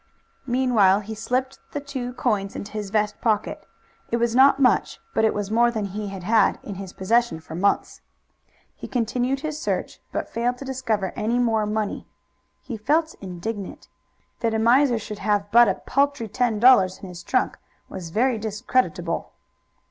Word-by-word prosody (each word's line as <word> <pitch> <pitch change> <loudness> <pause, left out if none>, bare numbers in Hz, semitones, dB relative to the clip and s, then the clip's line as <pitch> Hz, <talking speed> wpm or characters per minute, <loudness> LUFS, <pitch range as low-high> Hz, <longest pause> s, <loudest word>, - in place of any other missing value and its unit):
Meanwhile 235 -6 +3
he 215 +2 -7
slipped 255 +4 -2
the 290 - -2
two 265 -3 -5
coins 200 -5 -1
into 200 - -6
his 210 -2 -4
vest 210 0 -1
pocket. 215 -3 -1 0.4
It 235 - +1
was 235 -1 +1
not 270 +1 +6
much, 255 -2 +2
but - - +1
it 220 - +4
was 205 0 -3
more 235 +2 +4
than 220 -3 -2
he 205 +2 -5
had 195 -2 -7
had 215 +1 +3
in 205 - -6
his 190 -2 -8
possession 230 -2 +1
for 160 - -11
months. 190 +5 0 0.7
He - - -8
continued 250 +2 -1
his 310 0 -4
search, - - -2
but - - -3
failed 240 +2 -1
to 275 - -8
discover 225 -8 -2
any 230 +2 0
more 225 -3 +1
money. 210 -1 -2 0.6
He 235 - -6
felt 310 +9 +1
indignant. 195 +2 -6 0.5
That 225 -1 0
a - - +1
miser 245 +2 +4
should 210 -1 -7
have 205 -1 0
but 235 +1 +7
a 190 - +1
paltry 280 -4 0
ten 230 0 0
dollars 200 -7 +6
in 195 - -10
his 175 -1 -9
trunk - - 0 0.3
was 180 -3 -7
very 235 +5 +1
discreditable. 220 +4 -1
225 Hz, 170 wpm, -24 LUFS, 205-250 Hz, 0.7 s, but